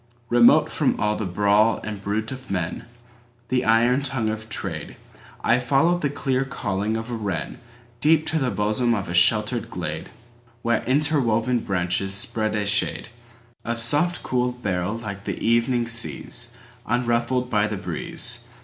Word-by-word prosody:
Remote 120 0 +5
from - - +1
all 105 +1 +1
the 105 - -3
brawl 105 +4 +3
and 105 -2 -5
bruit 105 +2 -2
of 130 0 -8
men, 90 -3 -3 0.6
The 125 -1 +1
iron 120 +4 +3
tongue 130 -5 -1
of 110 0 -6
Trade,I 115 +3 -3
followed 140 +8 +2
the 145 - +1
clear 135 -2 0
calling 105 -5 -2
of 115 +2 -6
a - - -2
wrenDeep 120 +7 -2
to 160 0 0
the 130 -3 0
bosom 110 +3 +1
of 100 -4 -4
a - - -3
sheltered 105 +6 +2
glade, - - -5 0.5
Where 115 -1 +2
interwoven 125 -4 +2
branches 95 0 -1
spread 110 +2 0
a 105 -1 0
shadeOf 105 +1 0 0.7
soft 150 +10 +1
cool 125 -1 0
beryl 100 -4 -2
like 100 -4 -7
the - - -3
evening 120 +1 +2
seasUnruffled 120 +1 -2
by 105 -1 +2
the 105 - -3
breeze. 125 - -2
115 Hz, 140 wpm, -23 LUFS, 105-125 Hz, 0.7 s, Remote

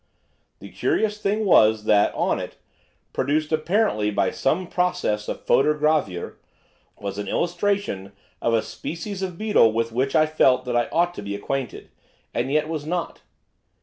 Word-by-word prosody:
The - - -12
curious 210 -1 0
thing 210 +1 0
was 110 - +5
that, 105 -1 +4
on - - 0
it, - - -7 0.6
produced 150 +3 0
apparently 155 - +1
by 95 -2 0
some 170 +7 0
process 180 -13 -1
of - - -5
photogravure, 150 - +1 0.6
was 100 0 -5
an 105 - -4
illustration 175 - -1 0.3
of 115 - +1
a 110 - +1
species 190 +4 -6
of 185 -3 -4
beetle 210 - +4
with 115 +1 -1
which 130 +6 -1
I 155 -1 +5
felt 135 -5 +3
that 125 -1 -2
I 120 -1 +1
ought 175 +1 +1
to - - -7
be 100 0 -4
acquainted, 135 +5 -4 0.4
and 130 +3 -1
yet 155 +1 +1
was 155 -2 -4
not. 170 +3 -3
150 Hz, 155 wpm, -23 LUFS, 115-180 Hz, 0.6 s, was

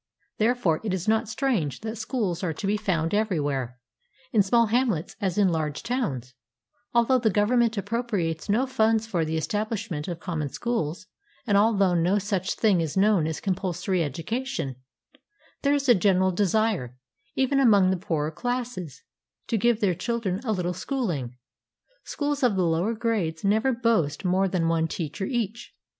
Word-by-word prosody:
Therefore 220 -8 +2
it 205 -4 -1
is 185 +2 -5
not 220 0 +2
strange 220 - -1
that 220 +1 -4
schools 220 -6 -2
are 170 -3 -1
to 195 - -6
be 200 +2 +2
found 170 -5 -1
everywhere, 145 - -1 0.5
in 220 - +4
small 230 +4 +3
hamlets 220 -7 0
as 190 -2 -1
in 200 -3 +4
large 155 -3 -2
towns, 140 - -2 0.6
although 235 +2 +3
the 230 -2 +2
Government 225 +3 +2
appropriates 200 -7 -2
no 230 +6 +3
funds 225 -3 +2
for 180 -7 -1
the 160 +1 -2
estabHsh 215 +4 -2
ment 150 -2 -3
of 170 -2 -4
common 160 -5 -3
schools; 185 - -3 0.4
and 205 -5 +2
although 200 -3 +4
no 175 +4 +2
such 195 -2 -1
thing 200 -6 +3
is 160 +2 -3
known 195 -5 +3
as 160 - -3
"compulsory 185 -1 -1
education," 165 - -3 0.9
there 285 0 +3
is 280 -1 -1
a 245 - +8
general 190 -2 +3
desire, 190 - 0 0.4
even 265 +1 +2
among 205 -8 +5
the - - +2
poorer 160 -4 -2
classes, 230 - -4 0.4
to - - -1
give 230 +1 +2
their 195 -4 +3
children 200 0 -2
"a 230 - -1
little 180 -3 -1
schooHng." 180 - -3 0.7
Schools 290 -1 -2
of 245 -6 +3
the 185 -2 +2
lower 170 +7 +1
grades 210 -9 -1
never 220 +6 +2
boast 220 - 0
more 185 +2 +2
than 175 -3 0
one 165 -1 +1
teacher 160 +3 -4
each. 235 -3 -3
200 Hz, 165 wpm, -26 LUFS, 165-230 Hz, 0.9 s, a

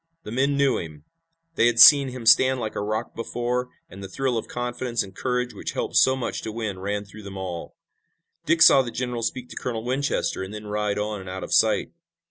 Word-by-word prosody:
The - - -8
men 135 +4 +1
knew 140 -2 +2
him. 75 -3 -9 0.5
They 120 - +3
had 120 -1 +1
seen 140 +3 +9
him 125 -2 -7
stand 130 +3 +5
like 110 -2 -5
a - - -2
rock 110 +3 -3
before, 120 +2 -3 0.2
and 95 - -12
the 95 - -6
thrill 130 +3 -1
of 115 - -3
confidence 120 -1 -3
and 95 -1 -13
courage 125 -1 -2
which - - -6
help - - -4
so 130 - +5
much 125 -3 -4
to 110 - -5
win 105 -4 -4
ran 100 +2 -3
through 105 +2 -13
them 100 -1 -9
all. 90 -3 -6 0.7
Dick 170 -1 +4
saw 135 - +7
the 125 - -5
general 125 0 -4
speak 125 +2 -3
to - - -11
Colonel 115 -3 -4
Winchester 135 -3 -1
and 95 +3 -6
then 105 0 -8
ride 105 0 -2
on 105 0 -3
and 95 -1 -9
out 95 +1 -6
of - - -5
sight. - - +2
115 Hz, 225 wpm, -24 LUFS, 105-125 Hz, 0.7 s, seen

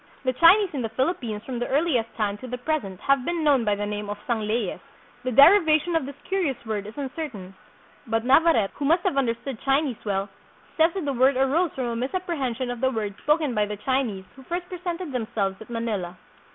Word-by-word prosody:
The 255 -1 +1
Chinese 365 - +6
in 275 - -2
the 225 - -2
Philippines 235 -4 -2
from 250 -3 -4
the 245 - -2
earliest 270 -6 +1
time 205 -2 0
to 255 - -8
the 250 0 -4
present 245 - -3
have 275 -2 +2
been 340 +2 -2
known 280 -5 +4
by 210 -2 +1
the 205 +1 -3
name 205 0 -4
of 205 - -4
"Sang 225 -4 -1
leyes." 215 -3 -1 0.4
The 255 - -1
derivation 315 - +6
of 305 -5 0
this 280 - -8
curious 360 -10 -1
word 210 -2 -3
is 215 - -11
uncertain; 265 - -6 0.5
but 225 +1 0
Navarrete, 260 -6 +4
who 285 - -4
must 335 +4 +3
have - - 0
understood 255 -1 -1
Chinese 275 -3 0
well, 195 -1 -1 0.5
says 325 +1 +4
that 375 -6 -3
the 280 - -1
word 260 +1 +3
arose 290 +7 +2
from 260 - -2
a 235 -1 -2
misapprehension 260 -3 -2
of 245 0 -6
the 260 - +3
words 215 -5 -3
spoken 300 -2 +1
by 210 -2 +1
the 210 0 -5
Chinese 240 -6 -1
who 270 - -13
first 345 +6 -4
presented 355 -2 -5
them 245 -4 -2
selves 195 -2 -1
at 220 - -11
Manila. 210 -7 -3
255 Hz, 215 wpm, -25 LUFS, 220-310 Hz, 0.5 s, Chinese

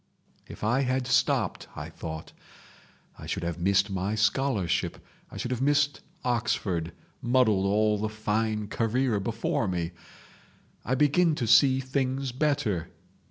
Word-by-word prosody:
'If - - -10
I 120 +5 +2
had 130 -1 0
stopped,' 125 - +1
I - - -7
thought, 80 -1 -7 0.9
'I - - -8
should - - -3
have 85 0 -3
missed 100 +2 +2
my 95 +3 -1
scholarship, 105 - +1 0.3
I - - -10
should 125 - -3
have 125 -1 -2
missed 145 +1 +2 0.2
Oxford—muddled 110 0 0
all 105 +1 +2
the 110 +1 -1
fine 110 0 -1
career 115 +1 0
before 115 +1 -1
me! 85 -2 -2 0.9
I 130 - 0
begin 150 +4 +3
to 125 - -2
see 130 +4 +5
things 130 0 -1
better! 125 - 0
115 Hz, 130 wpm, -27 LUFS, 100-130 Hz, 0.9 s, see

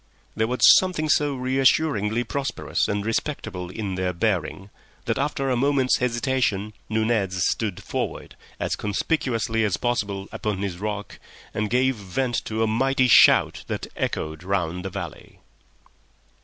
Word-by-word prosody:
There 110 - +1
was 125 +2 -3 0.2
something 180 -5 -2
so 145 -1 +2
reassuringly 130 -3 +2
prosperous 135 +2 -2
and 100 0 -2
respectable 110 -7 -3
in 100 0 -4
their 90 0 -1
bearing 95 0 -2 0.3
that - - -1
after 135 -1 -1
a - - +2
moment's 135 0 +2
hesitation 120 -4 0 0.2
Nunez 110 -5 +1
stood 105 -5 -2
forward - - -4 0.2
as - - -1
conspicuously 115 0 -1
as 105 -4 +1
possible 100 -5 -2
upon 105 -2 -3
his 90 -3 -4
rock, 105 0 -5 0.3
and 105 0 -1
gave 130 +1 +2
vent 115 +5 -2
to 110 +1 -1
a - - +2
mighty 130 +4 +2
shout - - +6
that - - -3
echoed 80 +1 -3
round 90 -2 -1
the 95 - -3
valley. 90 -4 -8
110 Hz, 140 wpm, -24 LUFS, 100-130 Hz, 0.3 s, shout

